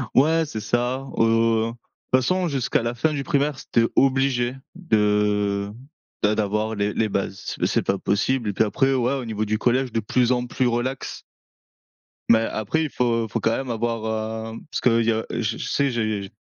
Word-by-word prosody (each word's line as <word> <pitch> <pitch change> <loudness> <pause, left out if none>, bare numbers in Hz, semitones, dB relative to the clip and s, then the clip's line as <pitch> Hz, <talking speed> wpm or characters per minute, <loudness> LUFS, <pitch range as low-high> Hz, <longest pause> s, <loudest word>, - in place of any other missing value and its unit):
Ouais, 160 +4 +4
c'est 115 -7 -5
ça, 120 +5 -1
heu, 115 0 +3
toute 120 +2 -2
façon 185 +7 +1
jusqu'à 135 -6 0
la 115 +1 -1
fin 150 +6 0
du 140 -2 -2
primaire, 145 -2 0
c'était 115 -1 +1
obligé 130 -2 +2 0.2
de 105 - +1 0.5
d'a 105 - +4
d'avoir 105 +1 -1
les 100 0 -1
les 110 -1 0
bases. 100 -1 -3
Mais - - +2
c'est - - +1
pas 100 - 0
possible 110 +4 0
et - - -2
puis 105 - +3
après, 135 +5 +1
ouais 125 0 +1
au 135 -3 -3
niveau 110 -1 -2
du 110 +1 0
collège 125 +2 +1
de 115 - 0
plus 120 +3 +1
en 125 -1 +1
plus 125 +1 0
relax. 120 +3 -2 1.1
Mais 115 -1 +6
après 115 +7 -1
il 155 - -2
faut 115 -3 0
faut - - -2
quand 115 - +1
même 135 -1 -4
avoir, 110 -1 -2
hem, - - -11
parce - - -4
que 115 -2 +4
il 115 - 0
y 115 - +5
a 110 0 -2
je 115 -1 -2
je - - -5
sais 140 -1 +1
j'ai 110 -4 -2
115 Hz, 195 wpm, -23 LUFS, 110-130 Hz, 1.1 s, Mais